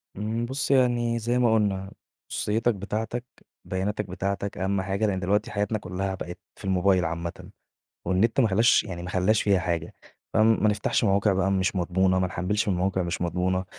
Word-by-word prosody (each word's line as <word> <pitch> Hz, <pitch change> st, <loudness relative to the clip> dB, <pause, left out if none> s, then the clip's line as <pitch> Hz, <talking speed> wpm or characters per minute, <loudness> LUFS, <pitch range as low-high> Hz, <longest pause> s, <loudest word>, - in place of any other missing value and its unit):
إمم 110 Hz, +3 st, -2 dB
بُصي 135 Hz, +3 st, 0 dB
يعني 120 Hz, -3 st, +2 dB
زي 120 Hz, +2 st, 0 dB
ما 120 Hz, -2 st, +3 dB
قُلنا، 100 Hz, -3 st, 0 dB, 0.4 s
خُصوصيَّتك 110 Hz, +2 st, 0 dB
بتاعتك، 110 Hz, +5 st, -4 dB, 0.4 s
بياناتك 100 Hz, +3 st, -2 dB
بتاعتك، 100 Hz, +2 st, -3 dB
أهم 95 Hz, 0 st, 0 dB
حاجة 95 Hz, +3 st, -1 dB
لإن 95 Hz, -2 st, -1 dB
دلوقتي 95 Hz, +3 st, 0 dB
حياتنا 105 Hz, +1 st, -1 dB
كُلّها 95 Hz, 0 st, -3 dB
بقت 90 Hz, -1 st, -7 dB, 0.2 s
في -, -, -11 dB
الموبايل 95 Hz, -1 st, +2 dB
عامَّةً، 85 Hz, +1 st, -5 dB, 0.6 s
والنت 95 Hz, +8 st, +2 dB
ما 120 Hz, -, +5 dB
خَلّاش 110 Hz, +5 st, +4 dB
يعني 90 Hz, -4 st, -6 dB
ما 90 Hz, -, -6 dB
خَلّاش 95 Hz, +4 st, +2 dB
فيها 100 Hz, -2 st, +3 dB
حاجة، 85 Hz, -2 st, -2 dB, 0.4 s
فما 110 Hz, 0 st, +4 dB
نفتحش 105 Hz, +2 st, 0 dB
مواقع 100 Hz, 0 st, +3 dB
بقى 95 Hz, +1 st, +1 dB
مش 95 Hz, 0 st, +1 dB
مضمُونة، 95 Hz, +1 st, +2 dB
ما 95 Hz, -, +1 dB
نحمِّلش 100 Hz, +5 st, -1 dB
من 95 Hz, -, +1 dB
مواقع 95 Hz, +1 st, 0 dB
مش 85 Hz, 0 st, -3 dB
مضمُونة، 90 Hz, +2 st, 0 dB
95 Hz, 175 wpm, -26 LUFS, 95-110 Hz, 0.6 s, ما